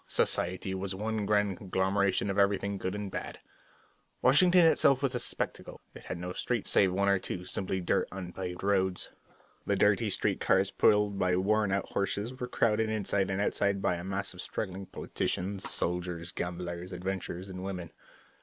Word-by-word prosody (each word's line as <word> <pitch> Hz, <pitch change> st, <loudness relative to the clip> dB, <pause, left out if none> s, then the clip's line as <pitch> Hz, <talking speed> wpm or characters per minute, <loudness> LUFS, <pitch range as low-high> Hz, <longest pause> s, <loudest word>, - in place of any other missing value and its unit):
Society 95 Hz, +2 st, +1 dB
was 95 Hz, 0 st, -3 dB
one 105 Hz, 0 st, -2 dB
grand 105 Hz, -2 st, +2 dB
conglomeration 95 Hz, +1 st, +1 dB
of 100 Hz, -, -1 dB
everything 100 Hz, 0 st, +1 dB
good 95 Hz, +2 st, -2 dB
and 105 Hz, -2 st, -4 dB
bad. -, -, -5 dB, 0.8 s
Washington 180 Hz, +7 st, +6 dB
City 165 Hz, -1 st, +7 dB
itself 140 Hz, 0 st, +3 dB
was 135 Hz, -1 st, +1 dB
a 125 Hz, -, -1 dB
spectacle. 120 Hz, -, -4 dB
It -, -, -12 dB
had -, -, -4 dB
no 90 Hz, +1 st, -5 dB
streets, 115 Hz, +3 st, -2 dB
save 95 Hz, -2 st, +4 dB
one 100 Hz, +2 st, +1 dB
or 100 Hz, -1 st, +4 dB
two 90 Hz, -1 st, -5 dB
simply 95 Hz, 0 st, -2 dB
dirty 85 Hz, -, +1 dB
unpaved 90 Hz, -1 st, -6 dB
roads. 95 Hz, -2 st, +1 dB, 0.6 s
The -, -, +2 dB
dirty -, -, +3 dB
street -, -, 0 dB
cars, -, -, +2 dB
pulled 105 Hz, -1 st, +3 dB
by 90 Hz, -1 st, +2 dB
worn 105 Hz, +2 st, +2 dB
out 100 Hz, -1 st, -1 dB
horses, 100 Hz, +4 st, -2 dB
were 125 Hz, -, -3 dB
crowded 110 Hz, -2 st, +1 dB
inside 100 Hz, -2 st, 0 dB
and 95 Hz, 0 st, -1 dB
outside 100 Hz, -1 st, +1 dB
by 95 Hz, -, +1 dB
a 85 Hz, 0 st, -4 dB
mass 95 Hz, +1 st, -2 dB
of 90 Hz, -, -7 dB
struggling 95 Hz, -1 st, -5 dB
politicians, 95 Hz, +1 st, -2 dB
soldiers, 90 Hz, -1 st, -2 dB
gamblers, 90 Hz, +1 st, -5 dB
adventurers, 95 Hz, 0 st, -4 dB
and 95 Hz, -1 st, -7 dB
women. 90 Hz, -3 st, -5 dB
95 Hz, 175 wpm, -30 LUFS, 90-105 Hz, 0.8 s, City